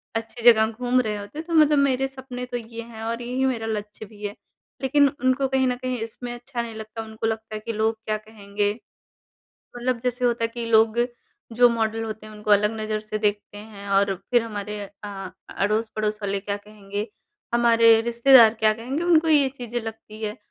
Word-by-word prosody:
अच्छी 225 Hz, +1 st, -5 dB
जगह 220 Hz, -1 st, +3 dB
घूम 245 Hz, +3 st, +1 dB
रहे 215 Hz, -3 st, -2 dB
होते, 205 Hz, +10 st, -7 dB
तो 335 Hz, +1 st, -7 dB
मतलब 305 Hz, -2 st, +5 dB
मेरे 270 Hz, -1 st, +2 dB
सपने 260 Hz, -2 st, -7 dB
तो 245 Hz, 0 st, -4 dB
ये 230 Hz, 0 st, -8 dB
हैं 225 Hz, -1 st, -10 dB
और 230 Hz, +1 st, -3 dB
यही 250 Hz, +2 st, -1 dB
मेरा 235 Hz, -4 st, -1 dB
लक्ष्य 210 Hz, 0 st, -5 dB
भी 210 Hz, 0 st, -15 dB
है। 205 Hz, 0 st, -4 dB, 0.5 s
लेकिन 285 Hz, +2 st, +4 dB, 0.2 s
उनको 260 Hz, +1 st, +3 dB
कहीं 265 Hz, 0 st, +1 dB
न 250 Hz, -, +1 dB
कहीं 255 Hz, 0 st, -3 dB
इसमें 240 Hz, +2 st, -6 dB
अच्छा 240 Hz, 0 st, -5 dB
नहीं 230 Hz, -1 st, -7 dB
लगता 220 Hz, +1 st, -7 dB
उनको 220 Hz, 0 st, -4 dB
लगता 220 Hz, -1 st, -4 dB
है -, -, -3 dB
कि 230 Hz, -, -2 dB
लोग 220 Hz, +1 st, +1 dB
क्या 215 Hz, 0 st, 0 dB
कहेंगे? 205 Hz, -1 st, -3 dB, 1.1 s
मतलब 245 Hz, 0 st, -1 dB
जैसे 250 Hz, 0 st, 0 dB
होता 235 Hz, -1 st, +1 dB
है -, -, +3 dB
कि 235 Hz, -1 st, -4 dB
लोग 220 Hz, 0 st, +4 dB, 0.6 s
जो 245 Hz, 0 st, +7 dB
मॉडल 225 Hz, -1 st, -1 dB
होते 220 Hz, -1 st, -6 dB
हैं, 215 Hz, -, -11 dB
उनको 210 Hz, 0 st, -2 dB
अलग 210 Hz, +1 st, +4 dB
नज़र 215 Hz, 0 st, -2 dB
से 215 Hz, 0 st, -4 dB
देखते 205 Hz, -1 st, -1 dB
हैं 205 Hz, -1 st, -10 dB
और 200 Hz, 0 st, +3 dB, 0.2 s
फिर 240 Hz, -2 st, +4 dB
हमारे 210 Hz, -1 st, -5 dB, 0.3 s
अ, 195 Hz, -2 st, -7 dB, 0.2 s
अड़ोस-पड़ोस 215 Hz, +1 st, -1 dB
वाले 200 Hz, 0 st, -1 dB
क्या 200 Hz, +1 st, -3 dB
कहेंगे? 205 Hz, 0 st, -6 dB, 0.5 s
हमारे 230 Hz, -1 st, +6 dB
रिश्तेदार 235 Hz, 0 st, +6 dB
क्या 215 Hz, 0 st, +4 dB
कहेंगे? 255 Hz, +8 st, -4 dB
उनको 330 Hz, -2 st, +4 dB
ये 285 Hz, -3 st, +5 dB
चीज़ें 240 Hz, -1 st, -4 dB
लगती 220 Hz, -1 st, -9 dB
है 215 Hz, +3 st, -3 dB
225 Hz, 195 wpm, -24 LUFS, 215-245 Hz, 1.1 s, जो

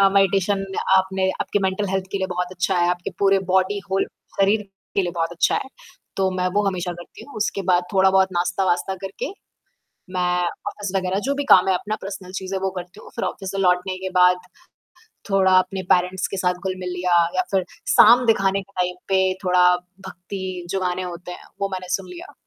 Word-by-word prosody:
अ, 195 Hz, -, +7 dB
meditation 195 Hz, 0 st, +2 dB, 0.3 s
आपने 190 Hz, 0 st, +1 dB
आपके 205 Hz, -, 0 dB
mental 190 Hz, +2 st, 0 dB
health 190 Hz, -1 st, -1 dB
के 200 Hz, -, 0 dB
लिए 190 Hz, -, -1 dB
बहुत 180 Hz, 0 st, -2 dB
अच्छा 185 Hz, 0 st, 0 dB
है, 175 Hz, -, +3 dB
आपके 175 Hz, 0 st, -3 dB
पूरे 195 Hz, -1 st, +4 dB
बॉडी 190 Hz, +2 st, +2 dB
होल 195 Hz, 0 st, +2 dB, 0.4 s
शरीर 205 Hz, +2 st, +3 dB, 0.3 s
के 195 Hz, -, +4 dB
लिए 175 Hz, -, -2 dB
बहुत 165 Hz, 0 st, -1 dB
अच्छा 170 Hz, -, +2 dB
है, -, -, -4 dB, 0.5 s
तो 190 Hz, -1 st, +1 dB
मैं 180 Hz, 0 st, +1 dB
वो 205 Hz, -, +4 dB
हमेशा 180 Hz, -2 st, -1 dB
करती -, -, -12 dB
हूँ, 285 Hz, -, -14 dB
उसके 205 Hz, -2 st, -1 dB
बाद 175 Hz, 0 st, +4 dB
थोड़ा 190 Hz, -1 st, +5 dB
बहुत 190 Hz, 0 st, +4 dB
नाश्ता-वाश्ता 180 Hz, +1 st, 0 dB
करके 430 Hz, -, -5 dB, 0.8 s
मैं 180 Hz, 0 st, +1 dB, 0.3 s
ऑफ़िस 205 Hz, -2 st, -4 dB
वग़ैरह 190 Hz, +1 st, 0 dB
जो 280 Hz, -, +2 dB
भी 285 Hz, -, -1 dB
काम 185 Hz, -, +7 dB
है 190 Hz, -, +4 dB
अपना 210 Hz, +4 st, -3 dB
पर्सनल 190 Hz, -1 st, -7 dB
चीज़ें 190 Hz, 0 st, -3 dB
वो 190 Hz, 0 st, -1 dB
करती 180 Hz, 0 st, -8 dB
हूँ -, -, -13 dB
फिर -, -, -2 dB
ऑफ़िस 195 Hz, -1 st, -4 dB
से 195 Hz, -, -5 dB
लौटने 185 Hz, 0 st, +1 dB
के 190 Hz, -, -2 dB
बाद, 180 Hz, 0 st, +6 dB, 0.9 s
थोड़ा 190 Hz, -1 st, +4 dB
अपने 190 Hz, 0 st, -1 dB
पैरेंट्स 180 Hz, +1 st, +1 dB
के 195 Hz, -, -5 dB
साथ 180 Hz, -1 st, +1 dB
घुल-मिल 185 Hz, -1 st, -3 dB
लिया 180 Hz, 0 st, 0 dB, 0.2 s
या -, -, +3 dB
फिर 190 Hz, -2 st, +2 dB, 0.3 s
शाम 240 Hz, +3 st, +7 dB
दिखाने 195 Hz, -3 st, +2 dB
के 200 Hz, +1 st, -23 dB
टाइम 180 Hz, 0 st, -1 dB
पे 190 Hz, -1 st, +3 dB, 0.2 s
थोड़ा 180 Hz, 0 st, +4 dB, 0.4 s
भक्ति 185 Hz, -1 st, -6 dB
जो 195 Hz, 0 st, -1 dB
गाने 180 Hz, 0 st, -1 dB
होते 180 Hz, 0 st, -7 dB
हैं, -, -, -11 dB, 0.2 s
वो 200 Hz, -, 0 dB
मैंने 185 Hz, -1 st, -5 dB
सुन 195 Hz, -, -2 dB
लिया। 180 Hz, -1 st, -10 dB
190 Hz, 205 wpm, -22 LUFS, 180-195 Hz, 0.9 s, अ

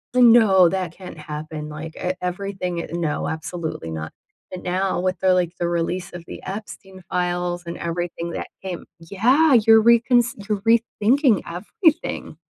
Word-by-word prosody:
"No, 225 Hz, -7 st, +6 dB
that 185 Hz, -3 st, -3 dB
can't 180 Hz, -3 st, -10 dB
happen," 150 Hz, 0 st, -6 dB
like, 155 Hz, +1 st, -8 dB
e 180 Hz, 0 st, -1 dB
everything 180 Hz, -1 st, -3 dB
e -, -, -4 dB
"No, 165 Hz, -3 st, -1 dB
absolutely 160 Hz, -, -5 dB
not." 80 Hz, 0 st, -6 dB, 0.4 s
But 185 Hz, -, -6 dB
now, 185 Hz, 0 st, 0 dB
with 185 Hz, 0 st, -1 dB
the, 185 Hz, -1 st, +3 dB
like, 180 Hz, -1 st, +1 dB
the 175 Hz, -, 0 dB
release 175 Hz, +2 st, -2 dB
of 175 Hz, -1 st, -8 dB
the -, -, -7 dB
Epstein 190 Hz, -2 st, -8 dB
files 175 Hz, 0 st, -1 dB
and 170 Hz, -, -5 dB
everything 170 Hz, 0 st, -3 dB
that -, -, -4 dB, 0.2 s
came 185 Hz, -3 st, -5 dB
Yeah, 245 Hz, -, +3 dB
you're 225 Hz, -1 st, +7 dB
reconsid 235 Hz, -2 st, +3 dB
you're 210 Hz, -2 st, -1 dB
re-thinking 230 Hz, -, +3 dB
everything. 295 Hz, -, -1 dB
180 Hz, 155 wpm, -22 LUFS, 170-210 Hz, 0.4 s, you're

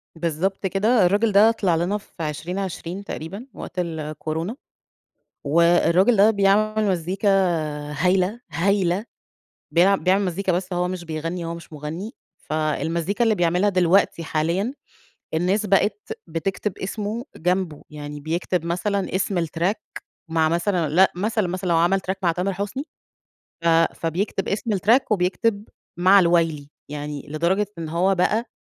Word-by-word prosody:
بالضبط 170 Hz, +4 st, -1 dB
كده، 210 Hz, +3 st, +3 dB
الراجل 205 Hz, +4 st, +2 dB
ده 210 Hz, +3 st, +6 dB
طلِع 195 Hz, -7 st, +1 dB
لنا 175 Hz, +5 st, 0 dB
في 185 Hz, -5 st, -10 dB
2020 175 Hz, +4 st, -4 dB
تقريبًا، 195 Hz, +8 st, -7 dB
وقت 180 Hz, -, -7 dB
الكورونا، 160 Hz, -, -3 dB, 0.9 s
والراجل 170 Hz, +7 st, +4 dB
ده 205 Hz, +3 st, +6 dB
بيعمل 215 Hz, +2 st, +2 dB
مزّيكا 190 Hz, +3 st, 0 dB, 0.6 s
هايلة، 185 Hz, +7 st, +1 dB
هايلة، 185 Hz, +3 st, +1 dB, 0.7 s
بيع 190 Hz, +4 st, +5 dB
بيعمل 190 Hz, +2 st, +2 dB
مزّيكا 185 Hz, +1 st, -1 dB
بس 180 Hz, +1 st, -2 dB
هو 180 Hz, 0 st, 0 dB
مش 180 Hz, -1 st, -5 dB
بيغنّي، 165 Hz, +2 st, -4 dB
هو 165 Hz, -, -4 dB
مش 170 Hz, -1 st, -12 dB
مُغنّي، 160 Hz, +8 st, -6 dB, 0.3 s
فالمزّيكا 160 Hz, -, -1 dB
اللي 220 Hz, -2 st, +3 dB
بيعملها 175 Hz, +3 st, +2 dB
دلوقتي 180 Hz, -2 st, +2 dB
حاليًا 170 Hz, -, -1 dB, 0.6 s
الناس 185 Hz, +6 st, +1 dB
بقِت 215 Hz, -, 0 dB
بتكتِب 180 Hz, +4 st, -3 dB
إسمه 210 Hz, +4 st, -4 dB
جنبه، 180 Hz, -2 st, -1 dB
يعني 150 Hz, -1 st, -7 dB
بيكتب 165 Hz, +3 st, -2 dB
مثلًا 190 Hz, +3 st, -1 dB
إسم 185 Hz, -3 st, 0 dB
الtrack 170 Hz, +7 st, -3 dB, 0.3 s
مع 160 Hz, -1 st, +2 dB
مثلًا 170 Hz, -1 st, 0 dB
لأ، 185 Hz, +6 st, +5 dB
مثلًا، 215 Hz, +1 st, 0 dB
مثلًا 185 Hz, +1 st, -3 dB
لو 170 Hz, -, +3 dB
عمل 175 Hz, +4 st, +3 dB
track 195 Hz, -, -2 dB
مع 170 Hz, -, +4 dB
تامر 180 Hz, +3 st, -1 dB
حسني 205 Hz, +8 st, -4 dB, 0.8 s
ف 170 Hz, -, +3 dB, 0.3 s
فبيكتب 185 Hz, +4 st, -2 dB
إسم 210 Hz, +2 st, -1 dB
الtrack 220 Hz, +7 st, +4 dB
وبيكتب 200 Hz, +2 st, +1 dB, 0.3 s
مع 190 Hz, +2 st, +6 dB
الوايلي، 165 Hz, -4 st, +1 dB, 0.2 s
يعني 145 Hz, 0 st, -5 dB
لدرجة 170 Hz, +7 st, +1 dB
إن 165 Hz, -1 st, -4 dB
هو 180 Hz, +4 st, +2 dB
بقى 215 Hz, +6 st, +1 dB
180 Hz, 135 wpm, -23 LUFS, 165-200 Hz, 0.9 s, ده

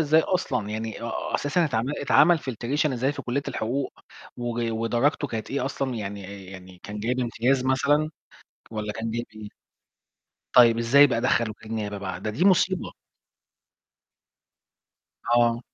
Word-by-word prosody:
إزاي 155 Hz, +1 st, +4 dB
أصلًا! 135 Hz, -, -1 dB
يعني 110 Hz, +1 st, -4 dB
آآ 115 Hz, -, -4 dB, 0.2 s
أساسًا 165 Hz, +5 st, +1 dB
اتعمل 130 Hz, -2 st, -1 dB
اتعمل 165 Hz, +4 st, +5 dB
filtration 135 Hz, +4 st, -1 dB
إزاي 130 Hz, +3 st, 0 dB
في -, -, -7 dB
كلية 130 Hz, +3 st, -1 dB
الحقوق، 130 Hz, +5 st, -2 dB, 0.4 s
وج 120 Hz, -1 st, -2 dB
ودرجته 120 Hz, +6 st, 0 dB
كانت 110 Hz, -3 st, -5 dB
إيه 135 Hz, -2 st, -1 dB
أصلًا، 135 Hz, -1 st, -2 dB
يعني 100 Hz, -2 st, -6 dB
يعني 95 Hz, -1 st, -12 dB
كان 105 Hz, 0 st, -7 dB
جايب 125 Hz, +4 st, -1 dB
امتياز 125 Hz, +2 st, +1 dB
مثلًا، 145 Hz, +4 st, +2 dB, 0.6 s
والّا 105 Hz, -1 st, -4 dB
كان 115 Hz, +1 st, -4 dB
جايب 120 Hz, +1 st, -3 dB
إيه؟ 105 Hz, -1 st, -8 dB, 1.0 s
طيب 120 Hz, -2 st, +7 dB
ازاي 135 Hz, +5 st, +6 dB
بقى 120 Hz, -4 st, -1 dB
دخل 115 Hz, -1 st, +2 dB
وكيل 110 Hz, +1 st, -10 dB
نيابة 105 Hz, -2 st, -3 dB
بقى؟ 95 Hz, -2 st, -5 dB
ده 105 Hz, -, -3 dB
دي 140 Hz, +12 st, -1 dB
مصيبة! 185 Hz, -1 st, +3 dB, 2.4 s
أه. 120 Hz, -1 st, +3 dB
120 Hz, 145 wpm, -25 LUFS, 110-140 Hz, 2.4 s, طيب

